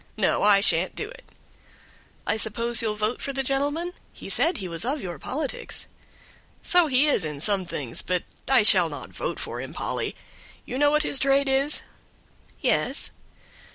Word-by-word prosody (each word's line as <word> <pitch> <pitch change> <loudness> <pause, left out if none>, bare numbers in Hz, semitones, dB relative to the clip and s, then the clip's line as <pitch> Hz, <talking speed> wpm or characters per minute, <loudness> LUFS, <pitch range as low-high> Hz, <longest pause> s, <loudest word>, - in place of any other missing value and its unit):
No, - - +1
I 205 -1 +5
shan't 175 -1 +3
do - - -5
it." - - -14 1.0
"I 205 - +2
suppose 230 +2 0
you'll 220 -2 -1
vote 215 +3 -2
for 275 - -3
the 270 0 -1
gentleman? 290 +6 -1 0.2
He - - -10
said 330 0 +2
he 190 - -5
was 165 +1 -4
of 275 +5 -1
your 175 - -6
politics." 280 - -5 0.8
"So 355 -2 +4
he 265 +1 +3
is 285 - +2
in 150 -2 -4
some 195 +3 +1
things, 135 -8 -5
but 180 -1 -1 0.3
I 260 -5 +5
shall 185 -5 +8
not 145 - -8
vote - - -4
for - - -4
him, - - -8
Polly; - - -3 0.5
you 255 - -4
know 290 0 +5
what 300 +1 +2
his 275 - +2
trade 275 0 +3
is?" 270 +2 +1 0.8
"Yes." - - +1
240 Hz, 175 wpm, -25 LUFS, 190-280 Hz, 1.0 s, shall